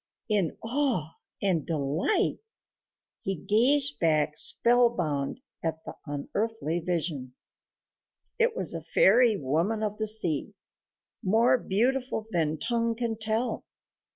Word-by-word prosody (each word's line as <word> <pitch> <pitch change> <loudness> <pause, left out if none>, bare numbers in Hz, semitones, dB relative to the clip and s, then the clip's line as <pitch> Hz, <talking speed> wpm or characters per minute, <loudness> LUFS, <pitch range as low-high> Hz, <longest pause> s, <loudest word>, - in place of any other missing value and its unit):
In 200 -7 +1
awe 230 - -1 0.3
and 180 -6 +1
delight 155 - -1 0.8
he 195 - -1
gazed 260 - +4
back 155 -2 +1
spellbound 235 - +1 0.2
at 160 -1 -3
the - - -7
unearthly 170 +4 -3
vision. 160 -7 -3 1.0
It 470 0 +2
was - - 0
a - - -5
fairy 245 - +4
woman 170 +10 -1
of 210 0 -3
the 215 - 0
sea, 180 -9 +1 0.7
more 225 +6 +3
beautiful 245 +3 -1
than 160 -3 0
tongue 230 +5 -1
can 230 -1 -2
tell. 220 +2 -1
210 Hz, 110 wpm, -27 LUFS, 160-235 Hz, 1.0 s, gazed